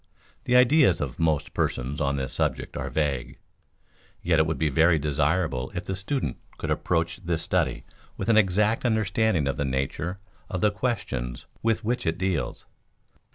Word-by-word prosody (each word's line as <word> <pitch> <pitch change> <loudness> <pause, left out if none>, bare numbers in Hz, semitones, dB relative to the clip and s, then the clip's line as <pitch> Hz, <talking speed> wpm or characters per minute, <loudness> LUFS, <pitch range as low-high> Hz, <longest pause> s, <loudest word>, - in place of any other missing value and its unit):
The 125 - +2
ideas 125 - +5
of 70 -4 -4
most 80 -3 +1
persons 65 +4 -1
on 70 0 +1
this 65 -2 -3
subject - - -1
are - - -3
vague, 70 -6 -1 0.9
yet 85 -2 +3
it 80 - +3
would 80 - -1
be 80 - +1
very 80 +4 +4
desirable 75 -2 0
if - - -3
the 95 - -2
student 115 +8 -2 0.2
could - - -3
approach 85 -1 0
this 85 -4 -2
study - - 0 0.3
with - - -4
an 115 - +4
exact 105 +2 +3
understanding 110 - +1
of 70 0 -1
the 70 - 0
nature 70 +7 -2 0.3
of 90 -4 -2
the 105 - +4
questions 100 - -3 0.2
with 115 0 +1
which 120 -1 -1
it 80 - 0
deals. 90 -8 -2
85 Hz, 165 wpm, -26 LUFS, 70-105 Hz, 0.9 s, ideas